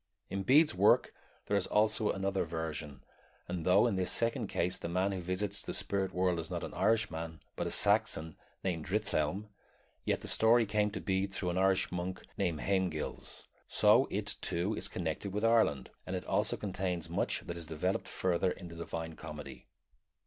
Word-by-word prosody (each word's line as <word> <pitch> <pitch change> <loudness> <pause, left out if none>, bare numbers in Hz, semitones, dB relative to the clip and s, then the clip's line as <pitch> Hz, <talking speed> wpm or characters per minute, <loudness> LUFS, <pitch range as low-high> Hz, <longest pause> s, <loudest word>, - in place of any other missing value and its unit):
In 100 - -1
Bede's 150 +9 +5
work - - +4 0.3
there 100 - 0
is 100 -2 +1
also 105 0 +2
another 95 0 0
vision, 80 -4 -4 0.4
and 90 -2 -4
though 95 +5 +5
in 110 -6 +1
this 95 - 0
second 115 -1 0
case 90 -1 -1
the 85 - -4
man 95 +3 +1
who 95 -2 -3
visits 95 +3 -1
the - - -4
spirit 95 -2 0
world 90 -1 +1
is 80 0 -4
not 90 -1 -3
an - - -6
Irishman, 85 -8 0 0.2
but - - -2
a - - -1
Saxon 100 -7 +2 0.3
named 85 -5 -1
Drithelm, 100 -1 -1 0.5
yet - - 0
the - - -7
story 115 +1 +4
came 105 0 +1
to - - -5
Bede 95 0 0
through 90 -2 -2
an 90 - 0
Irish 95 0 +3
monk 90 +1 -4
named 80 -4 -1
Haemgils; 95 -5 -2 0.2
so - - +5
it, - - -2
too, 90 +5 0
is - - -3
connected 90 +3 -3
with 105 +2 0
Ireland, 110 - +3 0.2
and - - -2
it - - -4
also - - +1
contains 90 -4 -2
much 85 - 0
that 85 - -6
is 85 -2 -6
developed 85 +5 -1
further 90 0 +1
in 90 -1 -6
the 85 - -10
Divine 80 -1 -5
Comedy. 75 -6 -9
95 Hz, 185 wpm, -33 LUFS, 85-100 Hz, 0.5 s, Bede's